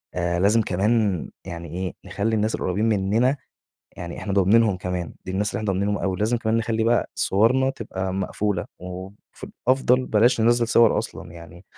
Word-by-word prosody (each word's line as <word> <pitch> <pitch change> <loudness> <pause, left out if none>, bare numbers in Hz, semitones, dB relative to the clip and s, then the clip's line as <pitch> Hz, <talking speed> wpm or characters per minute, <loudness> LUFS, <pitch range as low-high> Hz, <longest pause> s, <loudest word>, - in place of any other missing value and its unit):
آآ 85 -1 0
لازم 105 +5 +4
كمان 100 -2 0 0.2
يعني 85 -2 -7
إيه، 95 -1 -3
نخلّي 110 +2 -1
الناس 110 +1 0
القريبين 95 +4 -1
منّنا، 110 +7 +2 0.6
يعني 85 -1 -7
إحنا 100 - -4
ضامنينهم 100 +2 +4
كمان 90 -1 -4
دي - - -6
الناس 105 +3 0
اللي - - -3
إحنا 110 - -4
ضامنينهم 100 +2 0
أوي، 95 -2 -1
لازم 110 +5 +1
كمان 115 -1 0
نخلّي 110 0 0
بقى 120 +1 +1
صورنا 125 +7 +2
تبقى 95 -6 -5
مقفولة 95 0 -2
وف 95 +2 -10 0.2
أفضل 130 -1 +3
بلاش 115 +3 +3
ننزّل 120 +1 +3
صور 115 -1 +5
أصلًا. 90 -6 -6
يعني 85 +1 -13
105 Hz, 170 wpm, -23 LUFS, 95-115 Hz, 0.6 s, صور